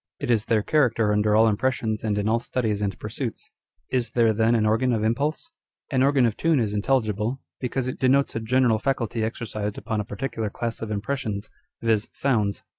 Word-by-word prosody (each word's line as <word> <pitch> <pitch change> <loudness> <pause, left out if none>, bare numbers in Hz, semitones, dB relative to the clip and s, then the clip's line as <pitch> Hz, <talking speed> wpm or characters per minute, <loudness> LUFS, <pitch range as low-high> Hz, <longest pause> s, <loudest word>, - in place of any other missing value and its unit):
It - - -1
is 110 -3 +2
their 110 -2 +2
character 115 -8 +2
under 105 0 +2
all 110 +1 +6
impressions 110 0 0
and 105 -2 0
in 105 0 0
all 115 +1 +2
studies 110 -4 -2
and 100 -1 -2
pursuits. 115 +2 -5 0.4
Is 120 -3 -1
there 115 -2 +4
then 110 +2 +3
an 110 -2 +2
organ 115 +4 +2
of 110 -2 0
impulse? 145 - -1 0.4
An 130 -2 +2
organ 135 -1 +4
of 115 -2 0
tune 165 -3 +2
is 105 -3 0
intelligible, 110 +1 0 0.2
because 130 0 -2
it 130 - -4
denotes 135 +2 +2
a - - 0
general 115 0 +2
faculty 115 -3 -1
exercised 110 -2 -4
upon 110 - -3
a - - -1
particular 110 +1 -4
class 115 +2 -4
of 110 - -4
impressions, 105 -1 -3 0.3
viz., 110 -2 +1
sounds. 110 -7 0
115 Hz, 190 wpm, -25 LUFS, 105-130 Hz, 0.4 s, all